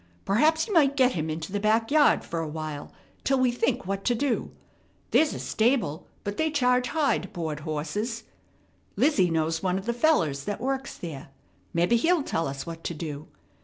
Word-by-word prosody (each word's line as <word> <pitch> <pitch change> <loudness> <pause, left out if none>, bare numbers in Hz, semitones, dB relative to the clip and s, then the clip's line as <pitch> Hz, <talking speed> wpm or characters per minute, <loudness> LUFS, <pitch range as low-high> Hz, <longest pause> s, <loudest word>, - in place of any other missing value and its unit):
Perhaps 310 +11 +3
you 425 - -3
might 285 -5 +4
get 255 -1 +5
him 160 -5 -2
into 160 +3 -4
the 205 - -1
back 220 +3 +2
yard 295 -1 +5
fer 165 - -3
a 165 - -2
while 155 -1 -6 0.3
till 270 - +2
we 255 -1 +3
think 245 0 0
what 195 +1 -3
to 245 - +2
do. 260 0 -1 0.6
There's 310 -1 +3
a - - -5
stable, 220 - 0 0.2
but 205 0 -4
they 315 0 +1
charge 250 -4 +2
high 310 -3 +1
to - - -8
board 160 -6 -4
horses. 165 +10 -3 0.7
Lizzie 195 - +3
knows 160 0 0
one 185 -1 0
of 195 - -5
the 235 - 0
fellers 170 - +2
that 205 - -3
works 270 +2 -3
there. 150 -6 -7 0.4
Mebbe 170 +4 +1
he'll 315 +7 +3
tell 165 - -1
us 135 0 -5
what 165 -1 -8
to 170 - -3
do. 150 -1 -6
205 Hz, 195 wpm, -26 LUFS, 160-265 Hz, 0.7 s, get